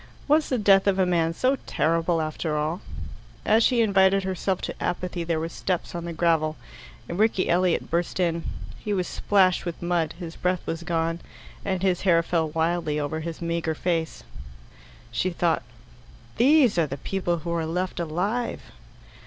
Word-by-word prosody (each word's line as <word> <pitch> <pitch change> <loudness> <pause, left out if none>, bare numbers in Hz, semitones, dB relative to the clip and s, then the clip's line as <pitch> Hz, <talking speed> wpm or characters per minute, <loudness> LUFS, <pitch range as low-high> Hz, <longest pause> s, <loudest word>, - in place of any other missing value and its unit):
Was 300 +1 +3
the 255 - +1
death 200 -2 +4
of 195 -1 +3
a 190 - +3
man 170 -2 +2
so 255 +10 +1
terrible 165 +1 +1
after 155 0 -2
all? 155 +5 -1 0.6
As 220 +2 +4
she 245 -1 +3
invited 195 -2 +4
herself 190 0 -1
to - - -3
apathy 180 0 -2
there 165 -1 -1
were 160 - -2
steps 180 +1 -3
on 170 -1 -4
the 170 - -4
gravel, 160 -2 +1 0.5
and 170 - -5
Rickie 215 -3 +2
Elliot 180 0 +1
burst 170 +2 -1
in. 170 -2 +1 0.4
He 210 - -3
was 185 -2 0
splashed 190 -3 +2
with 175 -2 -5
mud, 170 -3 0
his 170 -2 -7
breath 180 -1 -1
was 165 0 -3
gone, 165 -1 -1 0.4
and 190 -2 -2
his 185 -2 +2
hair 170 -3 +4
fell 165 -2 0
wildly 160 -1 0
over 150 +2 -2
his 165 +1 -6
meagre 170 -1 -1
face. 165 -1 -2 0.9
She 185 - 0
thought, 170 -2 +1 0.8
"These 260 - +5
are 160 - +2
the 140 0 -5
people 175 +3 -1
who 170 +1 -5
are 165 -1 -1
left 180 +3 -2
alive!" 185 +9 -2
175 Hz, 170 wpm, -25 LUFS, 165-190 Hz, 0.9 s, These